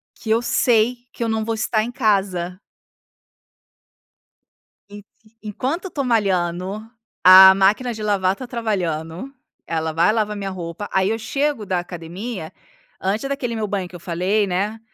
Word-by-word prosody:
que 220 - -9
eu 230 - +3
sei 240 0 +2 0.2
que - - -4
eu 230 - -1
não 220 -1 -1
vou 225 - -1
estar 220 -1 0
em 240 - -5
casa. 190 -6 0 2.3
E 205 0 -11 0.4
e 215 - -10
enquanto 275 - -3
eu 375 - -6
tô 280 - -2
malhando, 190 -3 0 0.4
a 190 +1 +10
máquina 215 +6 +2
de 215 -1 -7
lavar 195 -2 +1
tá 255 - -8
trabalhando, 190 - -3 0.3
ela 160 -1 -2
vai 170 +5 +3
lavar 215 -1 0
a - - -7
minha 195 -1 -4
roupa, 180 +2 -6
aí 190 +1 +2
eu 225 - 0
chego 275 0 -2
da 185 -2 0
academia, 175 +2 -7 0.5
antes 210 +8 -1
daquele 250 -4 -3
meu 215 -1 -2
banho 195 -3 -3
que 180 - -14
eu 175 - -8
falei, 185 +5 0
né. 200 +4 -2
205 Hz, 165 wpm, -21 LUFS, 185-225 Hz, 2.3 s, a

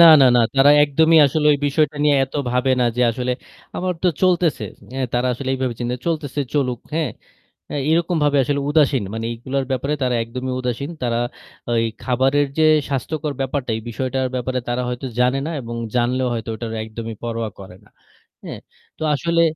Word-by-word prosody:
না, 170 - +11 0.2
না, 130 - +8
না। 120 - +5 0.2
তারা 140 +2 +7
একদমই 160 +3 +4
আসলে 150 +2 0
ঐ - - +4
বিষয়টা 150 +1 +1
নিয়ে 145 -1 +4
এত 135 - -18 0.2
ভাবে 125 +2 +1
না 125 - +4
যে 125 - +2
আসলে 125 +2 -2 0.4
আমার 180 0 -1
তো 185 - +4
চলতেছে। 175 -9 +2 0.3
এ - - -3 0.2
তারা 120 +1 +1
আসলে 130 +2 -5
এইভাবে 130 -2 -2
চিনতে 120 +1 -1
চলতেছে 150 -4 -1
চলুক। 125 -4 0 0.2
হ্যাঁ, 155 -5 0 0.6
এ - - -2 0.2
এরকমভাবে 160 -4 +2
আসলে 140 +2 0
উদাসীন। 145 -6 +3
মানে 115 0 -3
এগুলার 130 +3 -3
ব্যাপারে 135 +3 -1
তারা 125 -1 +1
একদমই 125 +2 -4
উদাসীন। 125 +3 -3
তারা 120 -1 0 0.5
ঐ - - +2 0.3
খাবারের 135 +3 +2
যে 160 - +4 0.3
স্বাস্থ্যকর 145 +3 -2
ব্যাপারটা 135 -2 -2
এই 110 - -6
বিষয়টার 130 +3 -1
ব্যাপারে 125 +1 -1
তারা 120 +1 0
হয়তো 125 +2 -4
জানে 125 +2 +3
না 165 - -3
এবং 120 -1 -6 0.2
জানলেও 125 +2 +1
হয়তো 115 -1 -4
ওটারে 115 0 -5
একদমই 110 0 -7
পরোয়া 115 -1 -2
করে 95 -2 -11
না। - - -23 0.6
হ্যাঁ, - - -7 0.4
তো - - -3
আসলে 170 +3 +1
130 Hz, 180 wpm, -21 LUFS, 120-145 Hz, 0.6 s, না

